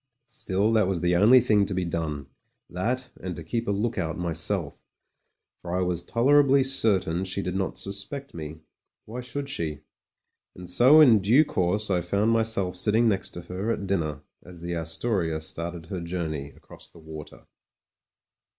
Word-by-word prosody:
Still, 105 Hz, -3 st, -1 dB
that 110 Hz, -4 st, +3 dB
was 95 Hz, -3 st, -1 dB
the 90 Hz, 0 st, +2 dB
only 110 Hz, +8 st, +7 dB
thing 105 Hz, -3 st, +3 dB
to 100 Hz, -, -3 dB
be 90 Hz, -1 st, -1 dB
done 80 Hz, -4 st, -3 dB, 0.2 s
— -, -, -37 dB
^that, 125 Hz, +8 st, -2 dB
and 90 Hz, -2 st, -5 dB
to 85 Hz, -, -8 dB
keep 115 Hz, +9 st, -3 dB
a -, -, +1 dB
look 105 Hz, +1 st, -1 dB
out 80 Hz, -3 st, -2 dB
myself, 85 Hz, -2 st, -2 dB, 0.8 s
for 90 Hz, 0 st, -3 dB
I -, -, 0 dB
was 90 Hz, -1 st, -1 dB
tolerably 135 Hz, +5 st, +4 dB
certain 100 Hz, -10 st, +1 dB
she 95 Hz, +1 st, -3 dB
did 90 Hz, -, -3 dB
not 95 Hz, 0 st, -2 dB
suspect 100 Hz, +9 st, -4 dB
me. 80 Hz, -1 st, -8 dB, 0.4 s
Why 120 Hz, +3 st, -6 dB
should 140 Hz, +3 st, -5 dB
she? 80 Hz, -, -3 dB, 0.7 s
And 90 Hz, -1 st, -10 dB
so 125 Hz, -, +6 dB
in 120 Hz, -8 st, +7 dB
due 120 Hz, +11 st, +5 dB
course 100 Hz, -2 st, 0 dB
I 90 Hz, -2 st, +2 dB
found 100 Hz, +6 st, +1 dB
myself 110 Hz, -5 st, 0 dB
sitting 110 Hz, +5 st, +3 dB
next 100 Hz, -3 st, -1 dB
her 90 Hz, +5 st, -5 dB
at 105 Hz, -3 st, -2 dB
dinner 80 Hz, -7 st, -2 dB, 0.2 s
as 90 Hz, -2 st, -13 dB
the 85 Hz, 0 st, -4 dB
Astoria 80 Hz, 0 st, -1 dB
started 85 Hz, +1 st, -5 dB
her 90 Hz, +1 st, -5 dB
journey 80 Hz, -5 st, -4 dB
across -, -, -14 dB
the -, -, -19 dB
water. 80 Hz, -2 st, -11 dB
95 Hz, 170 wpm, -26 LUFS, 85-115 Hz, 0.8 s, only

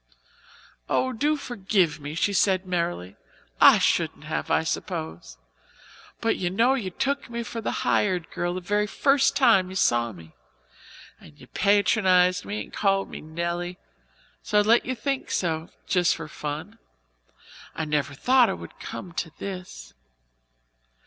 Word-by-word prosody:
"Oh, 260 Hz, 0 st, +1 dB
do 295 Hz, +6 st, +1 dB
forgive 195 Hz, -, 0 dB
me," 145 Hz, +1 st, -7 dB
she 200 Hz, +4 st, +1 dB
said 190 Hz, -1 st, +2 dB
merrily. 170 Hz, -, -3 dB, 0.4 s
"I -, -, +9 dB
shouldn't -, -, 0 dB
have, -, -, -4 dB
I -, -, +2 dB
suppose 80 Hz, +2 st, -5 dB, 0.8 s
but 225 Hz, -, +1 dB
you 180 Hz, -, -1 dB
know 230 Hz, +8 st, +3 dB
you 230 Hz, -8 st, -2 dB
took 275 Hz, +8 st, -2 dB
me 235 Hz, 0 st, -4 dB
for 230 Hz, 0 st, -6 dB
the -, -, -2 dB, 0.2 s
hired 185 Hz, -5 st, +1 dB
girl 175 Hz, 0 st, -2 dB
the 185 Hz, -, -4 dB
very 205 Hz, +3 st, 0 dB
first 275 Hz, +4 st, +2 dB
time 225 Hz, -9 st, +4 dB
you 190 Hz, -, -8 dB
saw 120 Hz, -9 st, +2 dB
me, 85 Hz, -5 st, -14 dB, 0.9 s
and 75 Hz, -2 st, -17 dB
you -, -, -13 dB
patronized 190 Hz, -2 st, +3 dB
me 210 Hz, +1 st, -4 dB
and -, -, -16 dB
called 195 Hz, -1 st, +1 dB
me -, -, -7 dB
Nelly; 170 Hz, +3 st, -4 dB, 0.6 s
so 210 Hz, -, 0 dB
I -, -, +7 dB
let 230 Hz, +3 st, +3 dB
you 255 Hz, -, -1 dB
think 265 Hz, +4 st, -3 dB
so 160 Hz, -2 st, -1 dB, 0.2 s
just 180 Hz, -2 st, +2 dB
for 160 Hz, -2 st, -7 dB
fun. 155 Hz, +9 st, -6 dB, 1.0 s
I 160 Hz, -, -2 dB
never 150 Hz, -2 st, -1 dB
thought 250 Hz, -, +4 dB
it 190 Hz, -, -2 dB
would -, -, -12 dB
come 180 Hz, -, -7 dB
to 165 Hz, 0 st, -3 dB
this. 180 Hz, -, -8 dB
185 Hz, 155 wpm, -25 LUFS, 165-220 Hz, 1.0 s, I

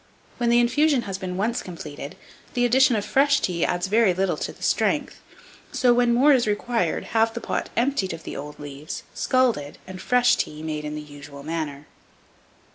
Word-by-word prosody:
When 240 Hz, -1 st, +1 dB
the 240 Hz, 0 st, +5 dB
infusion 255 Hz, +2 st, +3 dB
has 195 Hz, -2 st, -5 dB
been 180 Hz, -1 st, -4 dB
once 225 Hz, +5 st, 0 dB
completed, 150 Hz, -5 st, -8 dB, 0.4 s
the 245 Hz, 0 st, +2 dB
addition 255 Hz, 0 st, +4 dB
of 205 Hz, -, -1 dB
fresh 280 Hz, +1 st, +3 dB
tea 175 Hz, -9 st, -1 dB
adds 175 Hz, +1 st, 0 dB
very 205 Hz, -1 st, +3 dB
little 190 Hz, 0 st, +1 dB
to -, -, -4 dB
the -, -, -14 dB
strength; -, -, 0 dB, 0.5 s
so, 250 Hz, -2 st, +3 dB
when 240 Hz, 0 st, +3 dB
more 270 Hz, +5 st, +5 dB
is 245 Hz, -4 st, +2 dB
required, 210 Hz, -3 st, 0 dB
have 225 Hz, 0 st, +2 dB
the -, -, -2 dB
pot -, -, -3 dB
emptied 235 Hz, -6 st, +1 dB
of 165 Hz, -1 st, -7 dB
the -, -, -7 dB
old 145 Hz, +1 st, -7 dB
leaves, 145 Hz, +1 st, -7 dB
scalded, 235 Hz, -, +1 dB
and 185 Hz, 0 st, -9 dB
fresh 245 Hz, +1 st, +3 dB
tea 155 Hz, +1 st, -4 dB
made 155 Hz, -1 st, -4 dB
in 150 Hz, 0 st, -4 dB
the 150 Hz, -, -5 dB
usual 145 Hz, -1 st, -11 dB
manner. 150 Hz, -2 st, -4 dB
195 Hz, 190 wpm, -24 LUFS, 155-245 Hz, 0.5 s, the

